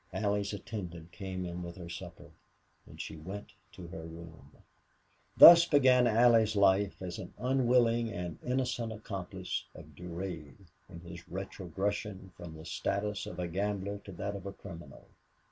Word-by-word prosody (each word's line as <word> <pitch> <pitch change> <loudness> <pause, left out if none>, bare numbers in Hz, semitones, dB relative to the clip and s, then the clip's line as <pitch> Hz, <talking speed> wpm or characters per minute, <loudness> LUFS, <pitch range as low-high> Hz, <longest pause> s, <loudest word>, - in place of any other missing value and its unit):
Allie's 100 -1 0
attendant 90 -5 -7
came 95 0 -5
in 85 0 -5
with 85 -1 -7
her 85 -2 -8
supper 85 -1 -9 0.6
and - - -14
she 80 - -6
went 95 +6 -8 0.2
to 90 - -9
her 80 - -7
room. 80 0 -11 0.9
Thus 170 0 +12
began 130 -4 +5
Allie 115 +1 +6
Lee's 110 -1 0
life 100 0 +3
as 90 -2 -5
an - - -9
unwilling 120 -3 +2
and 90 -4 -5
innocent 125 -2 -1
accomplice 95 -4 -5
of 75 - -12
Durade 85 0 -7 0.2
in 85 - -10
his 85 +1 -11
retrogression 95 +1 -4
from 85 -2 -9
the 80 - -11
status 100 +4 -2
of - - -7
a 90 -1 -2
gambler 100 +2 -2
to 100 - -11
that 100 +3 -4
of 100 0 -7
a 100 - -5
criminal. 80 -11 -11
95 Hz, 155 wpm, -32 LUFS, 85-105 Hz, 0.9 s, Thus